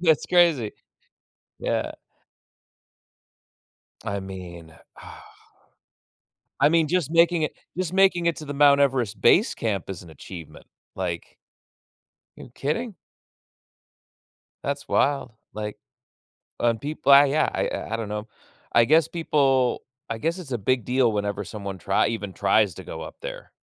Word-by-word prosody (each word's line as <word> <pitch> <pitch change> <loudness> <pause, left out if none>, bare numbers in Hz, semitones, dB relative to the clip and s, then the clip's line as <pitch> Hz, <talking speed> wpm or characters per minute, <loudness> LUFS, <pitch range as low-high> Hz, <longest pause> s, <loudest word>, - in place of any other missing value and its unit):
That's 160 -4 +3
crazy, 165 -11 +3 0.9
yeah. - - -1 2.1
I 100 0 -3
mean, 90 -4 -9 0.3
uh - - -11 1.4
I 145 - +7
mean, 165 -1 +3
just 175 -3 0
making 170 0 +4
it, 155 - -1 0.2
just 180 -1 -2
making 190 -3 +4
it 170 - +2
to 155 - -8
the 145 - -5
Mount 140 0 +5
Everest 125 -7 0
base 205 - +4
camp 100 -5 -2
is 95 -3 -6
an 85 - -13
achievement, 80 +1 -11 0.3
like, 90 -3 -5 1.0
you - - -12
kidding? 200 - -3 1.7
That's 140 0 -3
wild, 140 -4 +1 0.2
like, 105 -1 -5 0.8
and 115 -2 +1
people 145 +2 0
uh, 140 +1 +10
yeah, 145 +2 +1
I - - 0
I 115 - -5
I - - +2
don't 115 -2 -4
know. 105 +1 -5 0.4
I 120 - +5
guess 155 +4 +4
people 135 -6 +1 0.3
I 115 - -3
guess 165 +9 -2
it's 160 -7 -10
a - - 0
big 125 +3 0
deal 125 -2 +2
whenever 105 -1 -2
someone 100 -2 -6
trie 95 +2 +1
even 105 -4 -4
tries 100 0 +2
to - - -9
go - - -7
up - - -8
there. - - -8
130 Hz, 140 wpm, -24 LUFS, 105-155 Hz, 2.1 s, uh